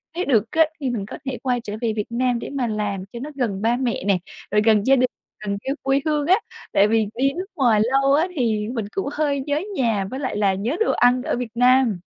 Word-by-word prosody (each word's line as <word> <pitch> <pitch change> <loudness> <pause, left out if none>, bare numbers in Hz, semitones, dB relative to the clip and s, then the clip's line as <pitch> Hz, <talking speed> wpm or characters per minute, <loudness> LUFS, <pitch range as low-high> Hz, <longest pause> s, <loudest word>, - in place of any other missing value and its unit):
nếu 360 - -1
được 225 -6 +3
á, 320 0 +5
thì 275 -4 -2
mình 225 -5 -3
có - - -8
thể 265 -2 -3
quay 250 -2 0
trở 210 -3 -7
về 230 -2 0
Việt 210 -2 -2
Nam 245 0 0
để - - -6
mà 270 -4 -2
làm 205 -3 -2
cho 235 - -6
nó 295 - -5
gần 220 -8 -2
ba 230 +2 +2
mẹ 245 -6 -2
nè, 200 -2 +3 0.3
rồi 210 +1 +3
gần 215 -2 +4
gia 270 - +6
đình, 255 -1 +3 0.4
gần 200 -1 -2
cái 270 - -1
quê 270 0 +2
hương 300 -2 0
á. 365 - +6 0.4
Tại 200 - +5
vì 220 -1 +2
đi 270 +3 +1
nước 365 +5 -4
ngoài 235 -6 +3
lâu 270 +3 +2
á 315 +5 +3
thì 220 -6 0
mình 225 -5 -2
cũng 390 -7 -1
hơi 290 -2 0
nhớ 295 +1 0
nhà 225 - +1
với 260 - -5
lại 260 -6 -3
là 200 -2 +2
nhớ 215 +10 -2
đồ 445 - +2
ăn 250 +1 +3
ở - - -1
Việt 245 -2 -4
Nam. 250 -4 +4
245 Hz, 255 wpm, -22 LUFS, 215-275 Hz, 0.4 s, gia